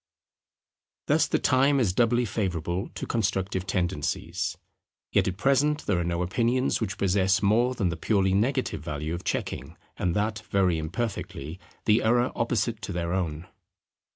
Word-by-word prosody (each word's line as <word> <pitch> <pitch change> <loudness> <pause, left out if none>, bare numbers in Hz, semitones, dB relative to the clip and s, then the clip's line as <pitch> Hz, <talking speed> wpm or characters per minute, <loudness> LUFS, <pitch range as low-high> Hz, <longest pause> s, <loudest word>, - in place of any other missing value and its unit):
Thus - - +3
the - - +1
time 135 +2 +3
is 105 -8 +2
doubly 120 +3 +3
favourable 90 -4 -2
to - - -4
constructive 95 -4 -1
tendencies; 90 -6 -2 0.5
yet - - +3
at 95 -1 -2
present 140 +5 +2
there 90 - +1
are - - 0
no 85 +1 -1
opinions 120 +9 +1
which 100 -3 -2
possess 95 +1 +2
more 120 +5 +3
than 100 -7 +1
the 85 - -2
purely 95 +1 +2
negative 125 - 0
value 75 0 -4
of 85 - -5
checking, - - -3 0.2
and 90 -1 0
that 110 +1 0
very 90 -4 +2
imperfectly, 85 - -4 0.3
the 110 +1 +4
error 120 +2 +2
opposite 115 -1 0
to 100 - -5
their 85 -1 -2
own. 85 -2 -2
100 Hz, 155 wpm, -27 LUFS, 90-120 Hz, 0.5 s, the